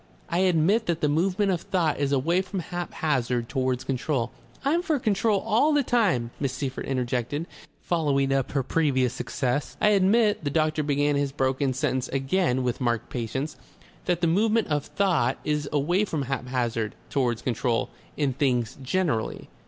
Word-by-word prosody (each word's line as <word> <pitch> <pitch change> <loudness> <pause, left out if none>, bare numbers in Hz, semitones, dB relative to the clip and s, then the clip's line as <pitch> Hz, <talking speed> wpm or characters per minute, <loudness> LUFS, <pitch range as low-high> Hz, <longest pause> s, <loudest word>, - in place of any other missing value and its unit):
I 170 - 0
admit 185 +5 +3
that 170 -1 0
the 150 - +3
movement 185 +6 +1
of 175 -3 -1
thought 165 -7 0
is 140 -1 0
away 160 +7 +2
from 190 0 -5
haphazard 150 -9 -2
towards 130 -1 -1
control 130 -2 -1 0.2
" - - -22
"I'm 320 +5 +3
for 330 -5 0
control 215 -4 +1
all 230 +8 +3
the 290 -1 +3
time," 195 - +1
Miss 135 -3 -1
Seyffert 130 -1 -4
injected, 130 +3 -1 0.4
following 140 -5 +1
up 135 -2 -1
her 140 -2 +1
previous 130 -4 +1
success. 130 +2 -2
"I 210 - +4
admit," 210 0 +3
the 145 - 0
doctor 155 +1 +1
began 145 0 +1
his 140 -1 0
broken 135 0 0
sentence 130 0 -1
again 135 0 +1
with 125 +1 -2
marked 120 -2 -1
patience, 130 +5 -3 0.5
"that 175 -1 0
the - - +3
movement 215 +6 +2
of 145 -1 -1
thought 170 -11 +1
is 150 -1 -1
away 170 +7 +2
from 155 -7 -2
haphazard 125 -4 -2 0.2
towards 120 -5 0
control 120 -1 0 0.3
in 140 -3 +1
things 125 -3 0
generally. 140 -4 -1
145 Hz, 165 wpm, -26 LUFS, 130-180 Hz, 0.5 s, I